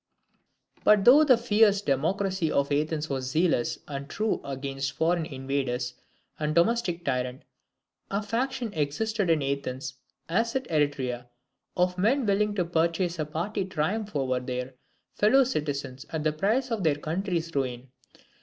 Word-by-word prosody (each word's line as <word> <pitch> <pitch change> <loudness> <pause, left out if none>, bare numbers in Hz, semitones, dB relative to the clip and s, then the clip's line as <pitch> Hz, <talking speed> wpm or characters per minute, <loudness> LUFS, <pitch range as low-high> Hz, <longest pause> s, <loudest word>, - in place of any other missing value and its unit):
But 210 -2 +5
though 280 +5 +8
"the 260 -5 +6
fierce 215 -3 +4
democracy" 185 +3 0
of 140 0 +1
Athens 150 +1 0
was 130 -3 -3
zealous 155 -5 +1
and 140 -1 -6
true 215 +5 -1
against 135 0 -4
foreign 165 0 +1
invader 135 -3 -2 0.6
and 155 0 -1
domestic 175 -2 +2
tyrant, 125 -1 -2 0.7
a 200 +2 -1
faction 240 +1 -2
existed 190 +7 -1
in 160 -3 +3
Athens, 135 -1 -3 0.3
as 230 +8 0
at 265 -1 -1
Eretria, 135 -5 0 0.5
of 180 0 +1
men 245 +7 +2
willing 205 +1 +1
to 180 -3 +1
purchase 170 +1 0
a 155 - 0
party 185 +7 -2
triumph 190 +4 -2
over 130 -2 +1
their 125 +1 -4 0.4
fellow 255 +6 +5
citizens 145 - -3
at 160 -2 -3
the 155 -1 +1
price 225 - 0
of 225 -3 -1
their 155 -3 +3
country's 165 +2 -2
ruin. 130 -2 -3
165 Hz, 145 wpm, -27 LUFS, 140-205 Hz, 0.7 s, though